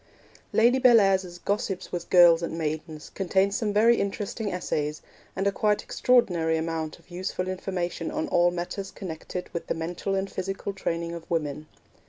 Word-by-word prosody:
Lady 240 Hz, +4 st, +4 dB
Bellairs's 195 Hz, -8 st, +4 dB
Gossips 195 Hz, 0 st, -2 dB
with 175 Hz, -1 st, -5 dB
Girls 175 Hz, -2 st, +7 dB
and 165 Hz, -1 st, -3 dB
Maidens 155 Hz, 0 st, -4 dB
contains 195 Hz, +1 st, +1 dB
some 220 Hz, -4 st, 0 dB
very 225 Hz, +3 st, +5 dB
interesting 200 Hz, +1 st, -2 dB
essays, 150 Hz, -4 st, -2 dB, 0.3 s
and 195 Hz, -, -1 dB
a 200 Hz, -, +3 dB
quite 210 Hz, +1 st, +1 dB
extraordinary 175 Hz, -10 st, +2 dB
amount 160 Hz, -1 st, -3 dB
of 170 Hz, +1 st, -24 dB
useful 185 Hz, +1 st, -3 dB
information 180 Hz, -2 st, -3 dB
on -, -, -2 dB
all 175 Hz, 0 st, +4 dB
matters 175 Hz, +3 st, -4 dB
connected 180 Hz, 0 st, -6 dB
with 170 Hz, -, -4 dB
the -, -, -1 dB
mental 175 Hz, +4 st, -3 dB
and 195 Hz, 0 st, -2 dB
physical 195 Hz, +1 st, -4 dB
training 170 Hz, -3 st, -3 dB
of 170 Hz, -1 st, -9 dB
women. 155 Hz, -2 st, -2 dB
180 Hz, 160 wpm, -26 LUFS, 165-200 Hz, 0.3 s, Girls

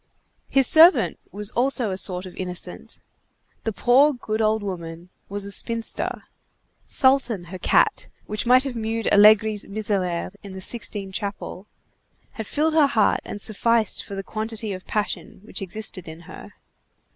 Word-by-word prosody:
His 270 Hz, -1 st, +4 dB
servant 315 Hz, -, +6 dB
was 205 Hz, +3 st, -4 dB
also 245 Hz, -3 st, 0 dB
a -, -, -2 dB
sort 185 Hz, -1 st, -1 dB
of 185 Hz, -, -11 dB
innocent. 180 Hz, -1 st, -6 dB, 0.7 s
The 225 Hz, -, 0 dB
poor 265 Hz, +7 st, +4 dB
good 225 Hz, -3 st, -3 dB
old 215 Hz, 0 st, +1 dB
woman 170 Hz, -2 st, -7 dB, 0.2 s
was 200 Hz, 0 st, -1 dB
a 200 Hz, -, -1 dB
spinster. 230 Hz, +2 st, -1 dB, 0.6 s
Sultan, 260 Hz, -7 st, +2 dB
her 185 Hz, -, -6 dB
cat, -, -, +2 dB, 0.2 s
which 210 Hz, +3 st, -4 dB
might 255 Hz, +1 st, +6 dB
have 270 Hz, -3 st, -5 dB
mewed 225 Hz, 0 st, -3 dB
Allegri's 210 Hz, 0 st, +5 dB
miserere 195 Hz, -5 st, -2 dB
in 200 Hz, -2 st, -10 dB
the 190 Hz, -, -7 dB
Sixtine 200 Hz, -1 st, -2 dB
Chapel, 200 Hz, -1 st, -6 dB, 0.6 s
had 220 Hz, -2 st, -7 dB
filled 315 Hz, +2 st, 0 dB
her 310 Hz, -3 st, +5 dB
heart 220 Hz, -6 st, +2 dB
and 205 Hz, -, -7 dB
sufficed 220 Hz, +2 st, +1 dB
for 200 Hz, -, -8 dB
the 195 Hz, -, -5 dB
quantity 215 Hz, 0 st, -4 dB
of 185 Hz, 0 st, -9 dB
passion 205 Hz, -5 st, -4 dB
which 215 Hz, -, -8 dB
existed 190 Hz, -1 st, -4 dB
in 160 Hz, +1 st, -10 dB
her. 170 Hz, -, -12 dB
215 Hz, 155 wpm, -23 LUFS, 190-230 Hz, 0.7 s, servant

